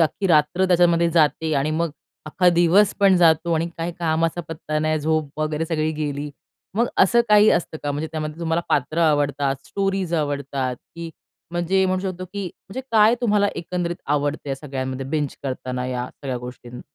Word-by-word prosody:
अख्खी 170 +5 +1
रात्र 160 +3 +3
त्याच्यामध्ये 170 -1 +4
जाते 160 -1 +2
आणि 140 +2 +1
मग 165 +1 0 0.4
अख्खा 180 +4 +2
दिवस 175 +4 +4
पण 195 -2 +6
जातो 170 0 +3
आणि 165 +1 +1
काय 165 +1 -2
कामाचा 165 +1 0
पत्ता 155 -1 -3
नाही, 155 0 0
झोप 155 -1 -1
वगैरे 155 +1 -1
सगळी 155 -1 0
गेली, 145 -1 -3 0.5
मग 235 +1 +3
असं 235 +5 +5
काही 210 0 +6
असतं 170 -2 0
का? 145 - -2
म्हणजे 150 +2 -3
त्यामध्ये 155 0 -4
तुम्हाला 165 0 0
पात्र 150 +4 0
आवडतात, 145 -3 +2
स्टोरीज 195 -3 -1
आवडतात, 140 -4 -2
की 165 +4 -10 0.4
म्हणजे 180 +2 +1
म्हणू 185 0 0
शकतो 185 -1 -4
की 200 -1 -4 0.2
म्हणजे 255 +7 -5
काय 220 +1 +6
तुम्हाला 205 -3 +2
एकंदरीत 175 0 -3
आवडतं 145 0 -1
या 135 - -1
सगळ्यांमध्ये 135 -2 -5
बिंज 145 -1 -2
करताना 130 -1 -4
या 125 -1 -3
सगळ्या 130 -3 -5
गोष्टीं? 125 0 -9
160 Hz, 170 wpm, -22 LUFS, 145-175 Hz, 0.5 s, पण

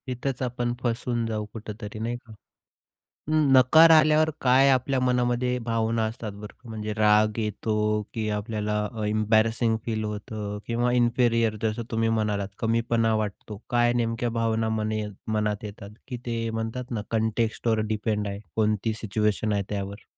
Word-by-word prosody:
तिथंच 130 +1 -3
आपण 120 -1 -1
फसून 120 0 -1
जाऊ 110 -1 -2
कुठेतरी, 105 -1 -7
नाही 115 +2 -2
का? 115 -2 -15 1.0
नकार 155 +1 +6
आल्यावर 155 0 +5
काय 130 +2 +5
आपल्या 130 +1 +1
मनामध्ये 125 0 +1
भावना 115 0 0
असतात 110 -1 -5
बरं 105 +1 -10
क - - -16
म्हणजे 110 -1 -4
राग 105 0 +3
येतो, 105 0 0
की 110 -2 -2
आपल्याला 105 0 -2 0.3
एम्बॅरसिंग 110 +2 +2
फील 110 -2 -1
होतं 105 0 -5
किंवा 120 +1 0
इन्फेरियर 120 -2 +2
जसं 110 +1 -1
तुम्ही 115 0 +1
म्हणालात 105 -3 0
कमीपणा 115 0 +1
वाटतो. 105 -1 -4
काय 120 0 +3
नेमक्या 120 0 0
भावना 115 -1 0
मने 110 0 -1 0.3
मनात 105 -1 -1
येतात? 100 0 -8 0.2
की 125 - -4
ते 115 -1 -2
म्हणतात 115 +3 -4
ना, 115 -4 -2
कॉन्टेक्स्टवर 110 0 0
डिपेंड 105 0 -1
आहे 100 0 -5 0.2
कोणती 110 0 +1
सिच्युएशन 105 0 0
आहे 100 -1 +1
त्यावर? 100 0 -5
115 Hz, 145 wpm, -26 LUFS, 105-120 Hz, 1.0 s, नकार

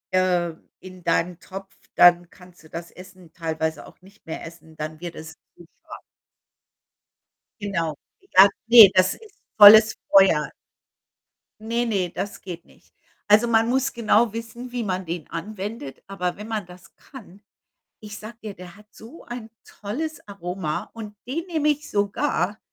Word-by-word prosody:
ähm, 175 -3 0
in 185 -1 -13
deinen 170 +1 0
Topf, 195 0 -10 0.2
dann 175 -1 +6
kannst 180 -1 -18
du 155 - -17
das 170 +1 -8
Essen 185 -2 -15
teilweise 160 -1 -4
auch - - -18
nicht 200 +1 -21
mehr 160 - -6
essen, 160 -1 -14
dann 155 0 -6
wird 170 0 -7
es 160 0 -10 0.2
zu 175 - -16 0.2
scharf. - - -11 1.6
Genau. 170 -6 -2 0.3
Egal 200 - +6 0.2
ne, 230 -4 +10
das 185 0 +3
ist 420 -2 -18 0.2
volles 215 +1 +9
Feuer. 190 -7 +5 1.1
Ne, 235 +2 -1
ne, 195 -6 -1
das 200 +3 -6
geht 175 -2 -9
nicht. - - -25 0.3
Also, 210 +3 +5
man 225 0 +2
muss 265 +2 0
genau 230 -1 +2
wissen, 230 +2 -8
wie 245 -1 -3
man 185 -2 -3
den 165 -2 -6
anwendet, 195 - -7
aber 180 -2 -3
wenn 210 +1 -9
man 220 -3 -3
das 180 +1 -16
kann, 205 -8 -15 0.6
ich 210 -1 -10
sage 215 +2 -10
dir, 215 -2 -6
der 180 0 -12
hat 210 +1 -19
so 235 +10 -14
ein 240 -2 -8
tolles 295 +10 -6
Aroma 180 -5 -5
und 215 -2 -9
den 325 +7 -3
nehme 315 -4 0
ich 295 0 -2
sogar 200 -1 -1
195 Hz, 155 wpm, -23 LUFS, 175-225 Hz, 1.6 s, ne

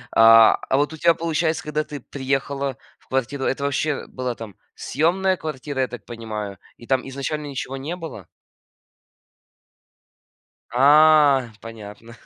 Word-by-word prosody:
А, 115 0 +8
а 135 - +3
вот 145 +2 0
у 160 - -8
тебя, 170 +1 +4
получается, 165 0 -1
когда 150 0 -2
ты 145 -2 -8
приехала 135 0 -3 0.2
в - - -30
квартиру, 135 +1 -2
это 140 - -1
вообще 140 +1 -1
была 125 -2 -4
там 110 -4 -10 0.2
съёмная 185 +7 +1
квартира, 140 -2 -4
я 130 - +1
так 120 - -10
понимаю, 105 -4 -6 0.2
и 120 - -14
там 130 0 0
изначально 145 +3 -4
ничего 135 -1 -5
не 150 +6 -5
было? 165 -5 -9 2.4
А, 145 -1 +5
понятно. 115 0 -11
135 Hz, 135 wpm, -22 LUFS, 120-150 Hz, 2.4 s, А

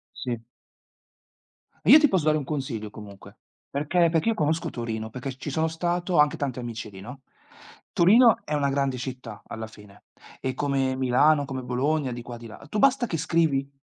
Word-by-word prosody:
Sì. 120 -3 -4 1.4
Io 275 - +10
ti 300 - +5
posso 185 - 0
dare 155 0 +4
un 150 - -2
consiglio 130 -7 -4
comunque, 100 -2 -12 0.3
perché 160 +5 +1
perché 165 +6 +1
io 225 - +2
conosco 155 -2 0
Torino, 110 -2 -4
perché 130 +2 -6
ci 145 - -6
sono 160 +3 0
stato, 175 +2 -2
ho - - +4
anche 150 0 +4
tanti 130 -3 -3
amici 115 -2 -6
lì, 95 -1 -11
no, 125 +7 -10 0.7
Torino 220 +5 +6
è 150 - -3
una 145 -1 +1
grande 135 -2 0
città, 125 -4 -7
alla 110 0 -7
fine, 105 -2 -17 0.4
e 130 -1 -2
come 135 -1 0
Milano, 135 +4 +3
come 135 -2 -5
Bologna, 130 +3 -1
di 120 0 -6
qua, 120 0 -8
di 115 0 -11
là. 110 - -12
Tu 210 - -3
basta 265 0 +3
che 165 - -2
scrivi 155 -4 +1
140 Hz, 185 wpm, -25 LUFS, 120-160 Hz, 1.4 s, Io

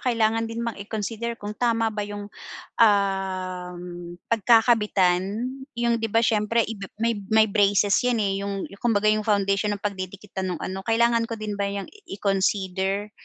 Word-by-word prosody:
kailangan 225 -2 +1
din 230 +1 -4
bang 235 -2 -3
i-consider 225 +3 -4
kung 205 -1 -6
tama 230 -1 +1
ba 210 - -3
yung, 205 0 -6 0.5
um, 190 -4 +1 0.5
pagkakabitan? 210 -5 +4 0.5
Yung 235 -1 +1
'di 225 - -1
ba 225 +2 +2
siyempre 220 +1 +2
iba 200 -3 -6
may 230 -1 0
may 220 0 +5
braces 200 0 +3
yan 250 -2 +1
eh, 195 0 -1
yung 200 -1 -3 0.2
kumbaga 215 -3 +2
yung 215 -1 -1
foundation 200 0 +1
ng 200 - -21
pagdidikitan 190 -1 -4
nung 180 - -4
ano 190 +1 -4
kailangan 230 0 +2
ko 230 - -4
din 215 -1 -4
ba 200 - +1
yang 200 0 -4 0.2
i-consider? 195 0 -1
210 Hz, 155 wpm, -24 LUFS, 195-225 Hz, 0.5 s, may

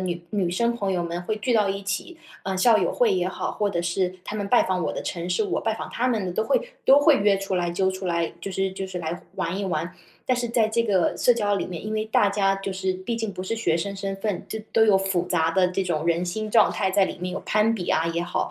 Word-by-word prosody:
女 175 -2 -3
女 195 -4 0
生 235 +7 +1
朋 200 -4 -1
友 180 - 0
们 170 0 -3
会 215 - -1
聚 215 +4 -1
到 210 -3 +3
一 195 0 -3
起 200 - -4 0.3
呃， 190 0 -2
校 225 +3 +5
友 180 - 0
会 230 -5 +3
也 180 -1 +1
好， 190 - -3
或 205 -1 -1
者 170 -3 -1
是 180 +1 -1
她 215 - -5
们 205 - -2
拜 245 - +5
访 185 -2 -1
我 - - -1
的 - - -4
城 175 -1 -4
市， 180 +5 +1
我 - - -1
拜 220 -1 0
访 - - -7
她 250 - -1
们 220 -6 0
的 180 - -3
都 220 +5 0
会 280 - 0
都 275 +2 +7
会 290 0 +6
约 200 -1 +3
出 195 -1 -2
来， 175 -1 0
揪 190 +2 +1
出 190 0 -5
来， 170 -1 0
就 195 +3 -5
是 190 +1 0
就 190 0 -5
是 185 -1 -5
来 165 +1 -4
玩 170 +3 -2
一 200 - -2
玩。 180 -1 -2 0.4
但 255 - +3
是 240 -1 -2
在 230 -1 +2
这 225 +2 +1
个 195 -6 +1
社 245 - +4
交 205 -4 0
里 200 - -2
面， 180 +3 -7
因 215 - -3
为 215 0 0
大 210 -1 +3
家 195 -1 +1
就 195 0 -4
是 190 0 -1
毕 185 +5 -4
竟 225 -2 -3
不 185 -1 -6
是 210 - -2
学 225 -7 +1
生 200 +4 -3
身 195 0 -4
份， 200 -1 -3
这 220 - -4
都 225 - +5
有 205 -3 +5
复 190 -2 0
杂 165 -2 +1
的 180 0 +3
这 190 +1 -1
种 160 -4 -1
人 170 +1 +1
心 215 +4 -3
状 220 -1 +5
态 190 -2 0
在 195 +1 +4
里 - - -5
面， 180 0 -4
有 190 - -3
攀 215 +1 +3
比 195 -6 -4
啊 160 - +2
也 165 0 -1
好， 175 +1 -2
195 Hz, 310 characters per minute, -24 LUFS, 180-215 Hz, 0.4 s, 都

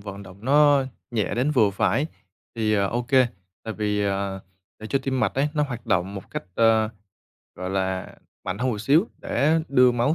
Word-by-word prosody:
vận 100 0 -8
động 95 0 -13
nó 145 0 +5 0.3
nhẹ 110 -3 -1
đến 130 +5 +1
vừa 110 -8 +4
phải 135 +8 +1 0.5
thì, 110 -2 +1
ờ, 100 -1 +2
ô 120 +4 -1
kê, 130 +1 +4 0.4
tại 110 - -4
vì, 105 -1 -1
ờ, 100 -1 -2 0.4
để 110 - -8
cho 135 - +1
tim 130 -1 -1
mạch - - +1
ấy, 140 +3 +1
nó 150 - +2
hoạt 120 -4 -5
động 95 -1 0
một 95 - -9
cách, - - -4
ơ, 110 -1 +4 0.7
gọi 90 0 -5
là, 95 -1 -2 0.3
mạnh 95 +2 -3
hơn 130 +2 0
một 110 - -3
xíu 150 - +3
để 155 +6 +1
đưa 125 -2 +5
máu, 120 +6 +1
115 Hz, 200 wpm, -24 LUFS, 100-135 Hz, 0.7 s, nó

